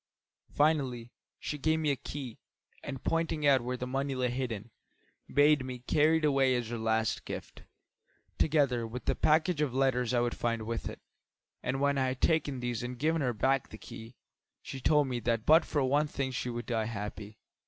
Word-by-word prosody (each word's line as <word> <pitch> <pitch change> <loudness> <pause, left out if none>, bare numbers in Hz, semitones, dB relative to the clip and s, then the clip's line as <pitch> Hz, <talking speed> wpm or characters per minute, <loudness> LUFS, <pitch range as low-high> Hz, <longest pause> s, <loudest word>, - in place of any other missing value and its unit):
Finally, 135 -6 +1 0.3
she 150 - -5
gave 160 +3 +2
me 155 -2 +1
a - - +1
key, 130 -3 -7 0.4
and 135 -2 -6
pointing 165 -2 0
out 135 -3 +5
where 125 +1 -3
the 125 - -4
money 135 +2 -2
lay 125 -1 0
hidden, 120 -4 -4 0.6
bade 145 -1 +5
me 130 -1 -5
carry 150 +6 +3
it 160 - 0
away 135 -3 +3
as 120 -2 -2
her 120 - -3
last 110 0 0
gift, - - -7 0.8
together 140 -7 +2
with 125 +3 -7
the - - +2
package 155 +1 +2
of 135 -4 0
letters 130 -3 +2
I 125 - +2
would 120 0 -1
find 115 -1 -1
with 115 +1 -3
it. - - -10 0.6
And 130 +1 -2
when 140 0 +2
I 130 - +2
had 130 0 -3
taken 145 -5 +1
these 120 -2 -2
and 125 +1 -5
given 160 +4 +1
her 125 -3 +1
back 130 +4 +1
the 110 - -10
key, 115 +2 -11 0.5
she 135 - -6
told 150 +1 +3
me 125 -2 -2
that 115 -1 -1
but 160 +2 +6
for 145 - 0
one 145 +3 +2
thing 135 -2 -3
she 125 0 -3
would 120 0 -4
die 115 -3 -1
happy. 105 -1 -6
130 Hz, 195 wpm, -31 LUFS, 120-145 Hz, 0.8 s, but